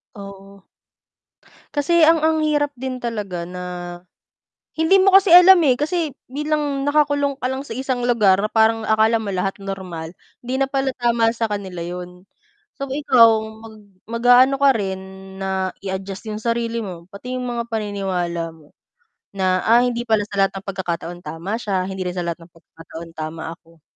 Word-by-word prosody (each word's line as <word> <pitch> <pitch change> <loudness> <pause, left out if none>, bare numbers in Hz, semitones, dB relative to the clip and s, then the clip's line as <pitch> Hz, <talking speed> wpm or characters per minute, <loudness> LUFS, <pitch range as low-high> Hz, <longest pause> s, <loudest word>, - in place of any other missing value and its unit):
Oo. 195 -1 -12 1.1
Kasi 315 +3 +4
ang 325 -1 +4
ang 315 0 +2
hirap 295 -1 +1
din 255 -1 -5
talaga 205 -7 -4
na 180 +1 -7 1.2
hindi 375 +4 +4
mo 390 - +5
kasi 385 -2 +6
alam, 360 +1 +9
eh, 255 - +5
kasi 310 +1 -2 0.2
bilang 290 -1 -1
nakakulong 290 -1 +2
ka 255 - +1
lang 265 +2 -4
sa 225 - -6
isang 255 -1 -2
lugar 210 -6 +4
na 210 - +1
parang 220 0 +2
akala 220 +1 +3
mo 205 -3 -4
lahat 195 +2 -2
normal, 185 -4 -6 0.3
'di 255 - -2
na 270 - -1
pala 270 -1 -1
tama 235 -1 +1
sa 225 -1 -2
kanila 190 -4 -4
yun. 180 +1 -7 0.6
So 275 - -3
ikaw, 255 -6 +4 0.2
mag 220 - -12 0.3
mag-a-ano 245 +3 +5
ka 280 - +7
rin 190 -2 -3 0.4
na 190 -1 -2
i-adjust 195 +2 -5
yung 210 - -4
sarili 235 0 -1
mo, 185 -5 -7
pati 250 +5 -7
yung 255 - -3
mga 235 -1 -3
paniniwala 190 -7 -3
mo, 155 -2 -20 0.6
na, 185 -1 +1
"Ah, 235 +2 +5
hindi 240 -1 -1
pala 220 -2 +2
sa 200 - -5
lahat - - -11
ng 190 - -14
pagkakataon 175 -2 -4
tama 185 +7 -4
siya, 195 -5 -1
hindi 190 -1 -4
rin 180 - -3
sa 180 - -2
lahat 170 -1 -3
ng 165 0 -17
pagkakataon 165 0 -12
tama 160 +1 -5
ako." 165 -2 -25
220 Hz, 170 wpm, -21 LUFS, 185-260 Hz, 1.2 s, alam